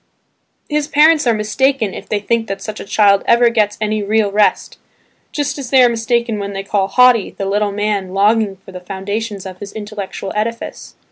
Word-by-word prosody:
His 295 -1 -1
parents 305 -1 +4
are 235 - +4
mistaken 215 +1 0
if - - -9
they 210 - 0
think 225 +2 -1
that 195 0 -4
such 215 +2 -7
a - - -6
child 200 -1 +3
ever 235 0 +5
gets 210 -3 +1
any 215 0 -1
real 210 0 +1
rest, 210 +1 +1 0.5
just 290 -1 -3
as 265 -3 -6
they 260 -1 +5
are 245 - +5
mistaken 235 -1 -1
when 200 0 -5
they 195 0 -4
call 195 -1 -1
"naughty" 250 -4 +5
the 195 - -3
little 205 +1 0
man 200 -2 -2
longing 205 0 +2
for 190 0 -16
the 180 - -8
foundations 200 +2 -5
of 185 -1 -9
his 200 0 -8
intellectual 205 -2 -6
edifice. 230 +2 -4
210 Hz, 195 wpm, -17 LUFS, 200-235 Hz, 0.5 s, ever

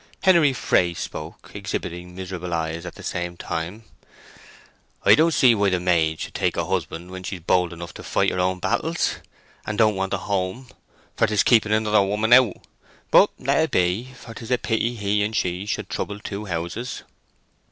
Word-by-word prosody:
Henery 170 -7 +5
Fray 90 -8 +1
spoke, 80 0 -7
exhibiting 90 +1 -5
miserable 90 -2 -4
eyes 80 0 -3
at - - -8
the - - -11
same 85 0 -4
time: 85 +9 -5 1.2
"I - - +8
don't 165 +2 +4
see 130 -6 +5
why 100 -2 +2
a 95 -2 +1
maid 80 -3 +1
should - - -6
take - - -1
a - - 0
husband 85 +3 -3
when 95 0 -7
she's 90 -1 -6
bold 90 +1 +2
enough 85 0 -8
to - - -10
fight - - +1
her 90 - -3
own 90 +1 +1
battles, 90 - -1 0.5
and 105 - -4
don't 110 -1 +4
want 95 0 -1
a - - -1
home; 100 +6 -3 0.5
for - - +3
'tis 105 -1 +2
keeping 110 -3 +4
another 110 -1 +3
woman 105 +4 +2
out. 125 -6 +6 0.6
But - - +7
let - - +1
it - - +2
be, 90 +8 +1
for 120 -3 -11
'tis 115 0 -9
a 125 - +3
pity 115 +1 -1
he 105 -1 0
and 110 +2 -2
she 90 +1 -1
should 105 - -3
trouble 100 0 -4
two 105 0 -6
houses." 85 +7 -4
95 Hz, 185 wpm, -23 LUFS, 90-110 Hz, 1.2 s, I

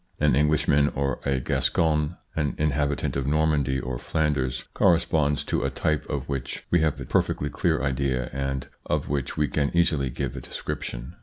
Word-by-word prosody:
An 75 -3 +4
Englishman 75 0 +3
or 70 -1 0
a 70 -1 +2
Gascon, 75 +4 +1 0.2
an 75 -3 0
inhabitant 75 -1 0
of 70 -1 -1
Normandy 75 -3 +2
or 65 -2 -4
Flanders, 70 -4 0
corresponds 80 -5 +3
to - - -1
a - - +1
type 75 -1 -1
of - - -3
which 70 -3 -4
we 85 - +5
have 75 -2 +1
a 65 - -5
perfectly 75 +4 +1
clear 85 -5 +1
idea 65 -2 0
and 70 0 -2 0.2
of - - -1
which 70 -4 -2
we 75 - +2
can 70 -1 0
easily 75 -6 +2
give 65 0 -3
a - - -5
description. - - -6
70 Hz, 170 wpm, -26 LUFS, 70-75 Hz, 0.2 s, we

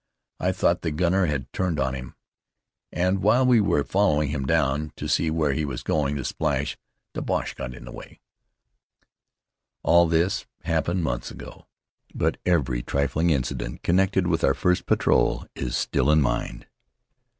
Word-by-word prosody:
I 90 - +1
thought 90 -2 +1
the 85 - -1
gunner 90 +4 +1
had 65 -4 -3
turned 90 -5 -1
on 65 -1 0
him. 65 -1 -7 0.8
And 90 +2 0
while 120 +6 +4
we 125 -3 +5
were 75 -8 +2
following 75 -7 +1
him 70 -2 -3
down 75 +4 +1
to - - -5
see 80 - +1
where 80 -3 +1
he 80 - -1
was 65 -4 -4
going 75 0 0
to 70 - -4
splash, - - -1 0.4
the - - -4
Boche - - -2
got 65 -1 -6
away." - - -11 1.6
All 85 0 +5
this 85 +3 0 0.2
happened 85 +2 0
months 60 -5 -2
ago, - - -11 0.5
but - - 0
every 65 -9 +1
trifling 70 +6 0
incident 65 -4 -2
connected 95 +1 +2
with 85 -2 0
our - - +3
first 90 0 0
patrol - - +2
is 65 -2 -3
still - - 0
fresh 75 - +4
in 75 - +4
mind. - - -2
80 Hz, 160 wpm, -25 LUFS, 70-90 Hz, 1.6 s, we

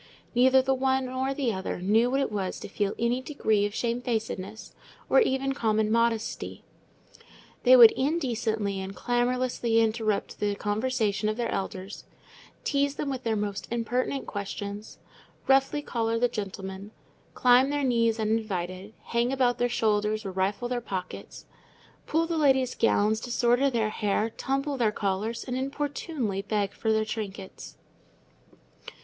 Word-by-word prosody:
Neither 260 +2 +5
the 265 0 +2
one 265 0 +1
nor 260 +1 -2
the 270 -4 -1
other 190 -1 -4
knew 220 +6 +3
what 270 +2 +1
it 270 - -1
was 195 -3 -3
to - - -6
feel 200 0 -2
any 235 +2 0
degree 220 -7 +1
of 205 - -9
shamefacedness, 225 -4 -3 0.4
or - - +7
even 270 - +1
common 220 -3 +1
modesty. 230 -1 -1 1.0
They 255 0 +7
would 235 -3 +10
indecently 230 - -1
and 190 +1 -6
clamorously 245 0 +1
interrupt 220 -2 0
the 205 -1 0
conversation 215 -1 0
of 215 - -2
their 235 -1 -1
elders, 195 0 -5 0.6
tease 280 0 +1
them 280 - -3
with 260 -2 -4
the 225 -1 0
most 205 -1 -3
impertinent 245 +3 -1
questions, 205 +1 -6 0.5
roughly 270 +2 +3
collar 230 -3 -1
the 245 +2 +3
gentlemen, 195 -2 -6 0.5
climb 250 +2 +5
their 290 0 -1
knees 230 -3 +2
uninvited, 205 -3 -2
hang 235 +2 0
about 255 -2 +1
their 245 - +2
shoulders 215 -1 0
or 195 - -3
rifle 190 +5 -1
their 245 0 -2
pockets, 185 -4 -6 0.6
pull 325 +2 +1
the 330 -1 -1
ladies' 265 -4 +3
gowns, 215 -1 +2
disorder 245 +3 +2
their 225 -4 0
hair, 215 +1 0
tumble 275 +4 -2
their 230 -4 +2
collars, 210 +3 -2
and 250 - -4
importunately 275 - -3
beg 205 -1 -1
for 220 - -1
their 220 0 +2
trinkets. 200 -3 -7
230 Hz, 145 wpm, -27 LUFS, 210-255 Hz, 1.0 s, would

